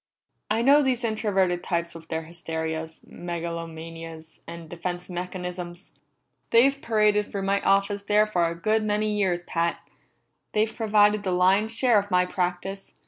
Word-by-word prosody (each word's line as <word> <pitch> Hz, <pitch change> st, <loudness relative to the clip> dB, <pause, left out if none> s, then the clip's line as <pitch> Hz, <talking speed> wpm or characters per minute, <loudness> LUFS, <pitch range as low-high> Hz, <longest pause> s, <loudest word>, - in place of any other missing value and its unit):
"I 220 Hz, +2 st, +1 dB
know 285 Hz, +3 st, +6 dB
these 255 Hz, -3 st, 0 dB
introverted 195 Hz, -5 st, +1 dB
types 170 Hz, -1 st, -2 dB
with 165 Hz, -1 st, -11 dB
their 160 Hz, 0 st, -3 dB
hysterias, 160 Hz, -1 st, -5 dB
megalomanias, 165 Hz, -1 st, -7 dB
and 170 Hz, 0 st, -8 dB
defense 175 Hz, +2 st, -5 dB
mechanisms! 180 Hz, 0 st, -6 dB, 0.6 s
They've 275 Hz, +4 st, +4 dB
paraded 210 Hz, -2 st, +2 dB
through 200 Hz, -1 st, -3 dB
my 200 Hz, +1 st, +1 dB
office 200 Hz, +1 st, +2 dB
there 210 Hz, +1 st, +4 dB
for 180 Hz, -5 st, +1 dB
a 165 Hz, -, -3 dB
good 215 Hz, +6 st, +1 dB
many 210 Hz, 0 st, 0 dB
years, 185 Hz, -4 st, 0 dB
Pat; 170 Hz, -1 st, -2 dB, 0.7 s
they've 215 Hz, +1 st, +1 dB
provided 210 Hz, -2 st, +3 dB
the 195 Hz, -, -3 dB
lion's 195 Hz, +5 st, +2 dB
share 240 Hz, -4 st, +5 dB
of 205 Hz, 0 st, -5 dB
my 180 Hz, -1 st, +3 dB
practice. 180 Hz, +2 st, -3 dB
185 Hz, 145 wpm, -25 LUFS, 170-210 Hz, 0.7 s, know